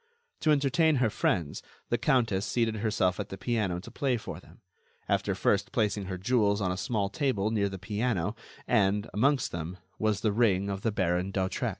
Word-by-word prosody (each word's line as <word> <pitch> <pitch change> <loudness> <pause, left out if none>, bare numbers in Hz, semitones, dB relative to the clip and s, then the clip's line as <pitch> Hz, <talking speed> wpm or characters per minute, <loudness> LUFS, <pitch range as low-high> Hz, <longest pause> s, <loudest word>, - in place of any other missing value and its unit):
To 155 - +1
entertain 150 +2 +3
her 125 -5 +2
friends, 85 -8 0 0.3
the 120 - +2
countess 120 -7 +2
seated 110 +2 0
herself 100 -4 +1
at - - -4
the 95 - -6
piano 105 -7 -1
to 115 - -11
play 130 0 0
for 110 - -7
them, - - -19 0.5
after - - +1
first - - +1
placing 105 -2 0
her 95 0 -4
jewels 100 0 +2
on 95 -3 0
a - - -1
small 100 0 -1
table 110 -2 0
near 100 -3 +1
the 95 - -6
piano, 105 0 -1 0.3
and, 100 +1 +2
amongst 135 +4 +2
them, 85 +2 -5 0.2
was 110 -2 +1
the 110 - +2
ring 100 -3 +2
of 100 0 -4
the 115 - 0
Baron 90 -2 0
d'Hautrec. 95 -1 -1
105 Hz, 190 wpm, -29 LUFS, 95-120 Hz, 0.5 s, entertain